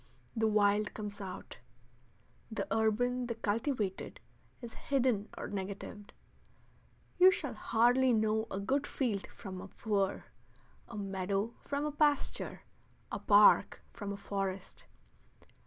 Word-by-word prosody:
The 220 -1 +2
wild 210 0 +2
comes 205 -1 -6
out. 190 -2 -8 0.9
The 220 - -2
urban, 245 +3 +1
the 235 - -3
cultivated, 220 -2 -2 0.4
is 235 -3 -9
hidden 250 -7 0
or - - -4
negatived. 200 +1 -6 1.1
You 370 +1 +10
shall 310 -7 -2
hardly 245 +4 +3
know 220 -1 +2
a 195 - -3
good 270 +8 0
field 220 -8 -1
from 185 -2 -8
a 195 - -8
poor, 200 -1 -1 0.6
a 230 - -8
meadow 195 +2 -2
from 285 +1 -2
a 300 - -1
pasture, 295 -1 0 0.5
a - - -3
park 205 -1 +5
from 205 -2 -5
a 200 - -4
forest. 195 -2 -4
215 Hz, 125 wpm, -33 LUFS, 200-245 Hz, 1.1 s, You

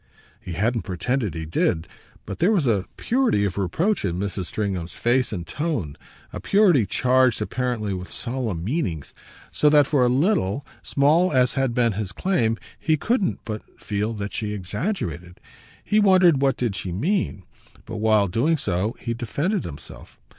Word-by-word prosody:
He 95 -6 -7
hadn't 115 +6 0
pretended 105 - -2
he 80 0 -4
did, 80 +1 0 0.4
but - - -6
there 180 +6 +4
was 185 -9 +2
a 105 -6 +1
purity 240 - +1
of 95 - -2
reproach 160 - 0
in 90 -3 -1
Mrs. 95 -1 -3
Stringham's 95 -5 -3
face 125 +1 +1
and 90 -5 -4
tone, 130 - -3 0.4
a - - -4
purity 180 - +4
charged 130 -1 +3
apparently 110 -2 -2
with 90 -1 -6
solemn 115 -9 -3
meanings; 95 - -2 0.4
so 150 - +3
that 145 -1 +6
for 140 -2 +2
a 125 - +4
little, 135 - +1 0.2
small 155 +6 +3
as 125 -2 +3
had 135 -3 0
been 120 -3 +2
his 95 -2 -4
claim, 115 - +1 0.2
he 155 -1 +1
couldn't 210 - 0
but 110 -1 -4 0.2
feel 105 +1 -2
that 105 -1 -5
she 105 -2 -2
exaggerated. 90 - -4 0.4
He 210 - +2
wondered 185 -8 +5
what 135 -1 +2 0.2
she 95 - -4
did 90 - -4
mean, 175 - -1 0.4
but 110 0 -6
while 105 -1 +3
doing 135 - +1
so 100 0 -1
he 115 - -3
defended 145 - -2
himself. 70 -3 -11
115 Hz, 165 wpm, -23 LUFS, 100-150 Hz, 0.4 s, that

